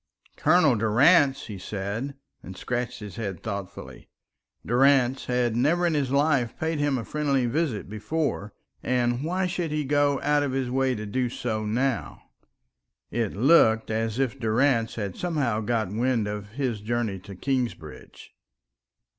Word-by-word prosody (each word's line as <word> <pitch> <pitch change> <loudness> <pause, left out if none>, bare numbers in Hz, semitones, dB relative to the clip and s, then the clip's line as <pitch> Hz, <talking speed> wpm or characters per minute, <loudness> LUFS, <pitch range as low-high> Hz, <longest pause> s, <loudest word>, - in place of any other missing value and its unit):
"Colonel 155 -4 +4
Durrance!" 135 - +4
he 100 -3 -8
said, 105 +8 -4 0.3
and 95 0 -10
scratched 125 -1 -3
his 105 -3 -8
head 100 -7 -5
thoughtfully. 100 -4 -7 0.6
Durrance 130 +1 +3
had 125 -2 0
never 160 +9 +2
in 170 - +2
his 145 -4 0
life 140 -4 +1
paid 160 -1 -1
him 145 -2 +1
a 115 - -5
friendly 140 -4 0
visit 125 -3 -1
before, 110 +1 -3 0.3
and 120 0 0
why 185 +4 0
should 175 -2 -2
he 150 -1 -2
go 145 0 +2
out 145 0 +3
of 140 -2 -1
his 130 -2 -1
way 130 0 +1
to 110 -1 -5
do 125 +4 -1
so 110 -3 -3
now? 125 +3 -1 0.9
It 115 -5 -2
looked 110 -3 +4
as 110 0 -1
if 135 -1 -1
Durrance 115 0 +1
had 100 -5 -4
somehow 145 -11 -1
got 110 -3 -1
wind 115 -1 +1
of 105 -1 -5
his 125 -5 -2
journey 110 -3 -2
to 95 +2 -11
Kingsbridge. 125 +3 -4
125 Hz, 150 wpm, -26 LUFS, 110-140 Hz, 0.9 s, Colonel